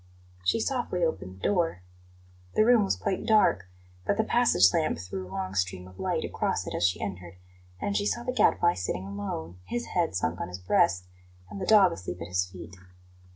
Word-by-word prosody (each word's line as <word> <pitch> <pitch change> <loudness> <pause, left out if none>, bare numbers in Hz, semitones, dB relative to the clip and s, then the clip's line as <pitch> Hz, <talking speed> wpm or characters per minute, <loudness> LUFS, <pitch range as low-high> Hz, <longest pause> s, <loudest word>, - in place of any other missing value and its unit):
She 90 - +2
softly 235 -7 -1
opened 95 - -2
the 95 - -18
door. 170 - 0 0.7
The 215 - +5
room 240 -2 +5
was - - +1
quite 200 -3 -2
dark, 210 - +4 0.4
but - - 0
the - - +3
passage 90 +1 +4
lamp 160 - +1
threw 90 +2 -6
a - - -13
long 95 0 -4
stream 90 -1 -2
of 95 0 -16
light - - -1
across - - -1
it - - -5
as - - -1
she 90 - -2
entered, 90 -3 -6 0.4
and 200 - -2
she 205 - +1
saw 240 - -1
the 250 - -2
Gadfly 175 -7 +3
sitting 90 +1 -3
alone, 95 -4 -5
his 240 - -4
head 170 - +1
sunk 85 -1 -1
on - - -3
his 90 +1 -7
breast, 90 0 +2 0.5
and 195 - -6
the 185 - -3
dog 200 -4 +7
asleep 90 - -6
at 85 0 -7
his 90 0 0
feet. 90 -1 -10
95 Hz, 200 wpm, -28 LUFS, -, 0.7 s, dog